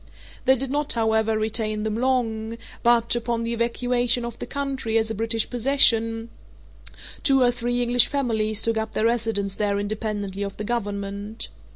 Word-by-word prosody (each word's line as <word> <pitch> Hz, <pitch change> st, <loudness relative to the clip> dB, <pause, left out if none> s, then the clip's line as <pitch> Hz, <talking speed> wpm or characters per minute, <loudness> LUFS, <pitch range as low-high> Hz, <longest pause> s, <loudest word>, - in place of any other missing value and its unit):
They 265 Hz, 0 st, +6 dB
did 265 Hz, +1 st, -4 dB
not, 295 Hz, +1 st, +1 dB
however, 220 Hz, -1 st, +1 dB
retain 215 Hz, -1 st, 0 dB
them 220 Hz, -1 st, -1 dB
long; 230 Hz, -3 st, -1 dB, 0.2 s
but, 235 Hz, -1 st, +3 dB
upon 235 Hz, -1 st, -1 dB
the 230 Hz, 0 st, -2 dB
evacuation 245 Hz, +1 st, +1 dB
of 235 Hz, -1 st, -7 dB
the -, -, -5 dB
country 270 Hz, -5 st, -2 dB
as 225 Hz, 0 st, 0 dB
a -, -, -1 dB
British 225 Hz, +1 st, 0 dB
possession, 230 Hz, -3 st, +2 dB, 0.9 s
two 270 Hz, -4 st, +4 dB
or 245 Hz, -, +4 dB
three 245 Hz, 0 st, -1 dB
English 245 Hz, 0 st, +5 dB
families 220 Hz, -6 st, 0 dB
took 230 Hz, -1 st, +1 dB
up 220 Hz, 0 st, -3 dB
their 220 Hz, -, 0 dB
residence 225 Hz, -4 st, 0 dB
there 200 Hz, 0 st, 0 dB
independently 205 Hz, -1 st, -3 dB
of 200 Hz, -1 st, -4 dB
the 210 Hz, -, -4 dB
Government. 205 Hz, -1 st, -4 dB
225 Hz, 165 wpm, -24 LUFS, 215-245 Hz, 0.9 s, They